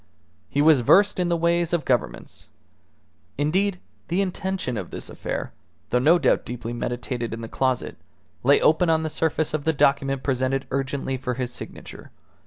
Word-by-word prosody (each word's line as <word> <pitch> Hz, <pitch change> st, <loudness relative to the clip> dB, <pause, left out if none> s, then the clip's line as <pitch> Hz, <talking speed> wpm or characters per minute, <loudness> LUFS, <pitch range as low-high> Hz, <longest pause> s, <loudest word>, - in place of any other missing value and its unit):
He 145 Hz, -, +1 dB
was 155 Hz, -3 st, +6 dB
versed 200 Hz, -, +4 dB
in 180 Hz, -1 st, +1 dB
the 170 Hz, -, +2 dB
ways 170 Hz, 0 st, +1 dB
of 170 Hz, -2 st, 0 dB
Governments. 125 Hz, -3 st, -2 dB, 0.9 s
Indeed, 180 Hz, +6 st, +1 dB, 0.3 s
the 175 Hz, +3 st, 0 dB
intention 190 Hz, -7 st, -2 dB
of 95 Hz, -5 st, -5 dB
this -, -, -7 dB
affair, -, -, -5 dB, 0.4 s
though 125 Hz, -, +3 dB
no 155 Hz, +7 st, +5 dB
doubt -, -, +2 dB
deeply 120 Hz, -1 st, -6 dB
meditated 120 Hz, -1 st, -3 dB
in 115 Hz, -, -8 dB
the 115 Hz, -, -5 dB
closet, 130 Hz, +1 st, -1 dB, 0.4 s
lay 140 Hz, +3 st, +5 dB
open 165 Hz, +2 st, +3 dB
on 160 Hz, 0 st, +2 dB
the 155 Hz, -, -3 dB
surface 160 Hz, -1 st, -1 dB
of 155 Hz, -2 st, -1 dB
the 160 Hz, -, +1 dB
document 135 Hz, -1 st, +2 dB
presented 130 Hz, 0 st, 0 dB
urgently 135 Hz, 0 st, -2 dB
for 125 Hz, -1 st, -3 dB
his 125 Hz, -1 st, -4 dB
signature. -, -, -9 dB
140 Hz, 170 wpm, -24 LUFS, 125-170 Hz, 0.9 s, was